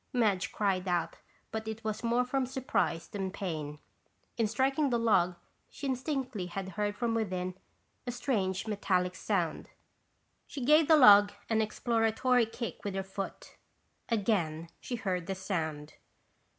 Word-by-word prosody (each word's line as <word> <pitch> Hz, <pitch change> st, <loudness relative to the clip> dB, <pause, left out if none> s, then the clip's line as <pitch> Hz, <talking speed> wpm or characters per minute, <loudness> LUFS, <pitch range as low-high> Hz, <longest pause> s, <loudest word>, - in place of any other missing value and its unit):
Madge 210 Hz, -6 st, +1 dB
cried 195 Hz, -3 st, 0 dB
out 170 Hz, -2 st, 0 dB, 0.3 s
but 220 Hz, 0 st, -4 dB
it 220 Hz, +1 st, -5 dB
was 215 Hz, 0 st, -3 dB
more 240 Hz, +2 st, +2 dB
from 260 Hz, 0 st, 0 dB
surprise 255 Hz, -10 st, -1 dB
than 195 Hz, -2 st, -3 dB
pain. 155 Hz, -7 st, -4 dB, 0.6 s
In 225 Hz, -2 st, +1 dB
striking 270 Hz, +6 st, +1 dB
the 240 Hz, -, +2 dB
log 190 Hz, -6 st, +3 dB, 0.3 s
she 280 Hz, -, -6 dB
distinctly 260 Hz, -, -2 dB
had 190 Hz, +2 st, -5 dB
heard 205 Hz, +2 st, -2 dB
from 235 Hz, 0 st, -1 dB
within 185 Hz, -5 st, -1 dB, 0.5 s
a -, -, 0 dB
strange 200 Hz, -8 st, -1 dB
metallic 185 Hz, -4 st, 0 dB
sound! -, -, -1 dB, 0.8 s
She 270 Hz, -4 st, -5 dB
gave 305 Hz, +2 st, +6 dB
the 315 Hz, -, +7 dB
log 205 Hz, -6 st, +8 dB, 0.2 s
an 220 Hz, 0 st, +3 dB
exploratory 230 Hz, +2 st, +2 dB
kick 235 Hz, +1 st, -6 dB
with 200 Hz, -2 st, -3 dB
her 195 Hz, -, -1 dB
foot. 195 Hz, 0 st, -7 dB, 0.5 s
Again 175 Hz, -8 st, 0 dB
she 245 Hz, -, -4 dB
heard 185 Hz, -6 st, -2 dB
the 195 Hz, -, -2 dB
sound. 160 Hz, -6 st, -3 dB
210 Hz, 145 wpm, -31 LUFS, 185-240 Hz, 0.8 s, log